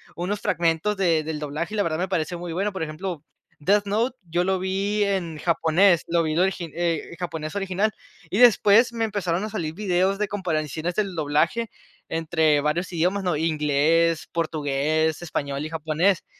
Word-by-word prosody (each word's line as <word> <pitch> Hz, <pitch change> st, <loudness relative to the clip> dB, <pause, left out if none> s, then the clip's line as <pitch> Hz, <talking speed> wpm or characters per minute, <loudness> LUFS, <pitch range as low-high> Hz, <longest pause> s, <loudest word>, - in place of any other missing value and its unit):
unos 195 Hz, +4 st, -2 dB
fragmentos 170 Hz, +4 st, 0 dB
de 170 Hz, -5 st, +2 dB
del 155 Hz, -1 st, -4 dB
doblaje 150 Hz, +7 st, -4 dB
y -, -, -2 dB
la 205 Hz, -, +3 dB
verdad 155 Hz, -1 st, -1 dB
me 180 Hz, +3 st, -1 dB
parece 170 Hz, -2 st, -1 dB
muy 170 Hz, -1 st, -6 dB
bueno. 200 Hz, +4 st, -1 dB
Por 190 Hz, -4 st, -4 dB
ejemplo, 160 Hz, 0 st, -5 dB, 0.4 s
Death 205 Hz, +5 st, +3 dB
Note, 230 Hz, +6 st, 0 dB
yo 175 Hz, +1 st, -1 dB
lo 190 Hz, +1 st, +1 dB
vi 200 Hz, +3 st, 0 dB
en 180 Hz, -6 st, -1 dB
japonés, 170 Hz, +2 st, +3 dB
lo 170 Hz, 0 st, +2 dB
vi, 155 Hz, -1 st, -1 dB
el 165 Hz, -, 0 dB
origi 180 Hz, -4 st, 0 dB
eh, 170 Hz, -1 st, -2 dB
japonés 160 Hz, -2 st, -5 dB
original, 195 Hz, +2 st, 0 dB, 0.4 s
y 200 Hz, -, 0 dB
después 230 Hz, 0 st, +6 dB
me 230 Hz, -1 st, -1 dB
empezaron 190 Hz, -3 st, -1 dB
a 215 Hz, -, -3 dB
salir 165 Hz, -7 st, -3 dB
videos 190 Hz, 0 st, +1 dB
de 210 Hz, 0 st, -1 dB
comparaciones 165 Hz, -3 st, -2 dB
del 200 Hz, -3 st, -1 dB
doblaje 165 Hz, +8 st, 0 dB, 0.4 s
entre 160 Hz, -2 st, +2 dB
varios 160 Hz, +5 st, -1 dB
idiomas, 180 Hz, +4 st, 0 dB
¿no?, 175 Hz, -5 st, 0 dB
inglés, 160 Hz, +1 st, +2 dB
portugués, 155 Hz, 0 st, 0 dB
español 140 Hz, -4 st, -3 dB
y 155 Hz, -, -5 dB
japonés. 160 Hz, +4 st, 0 dB
170 Hz, 175 wpm, -24 LUFS, 155-195 Hz, 0.4 s, después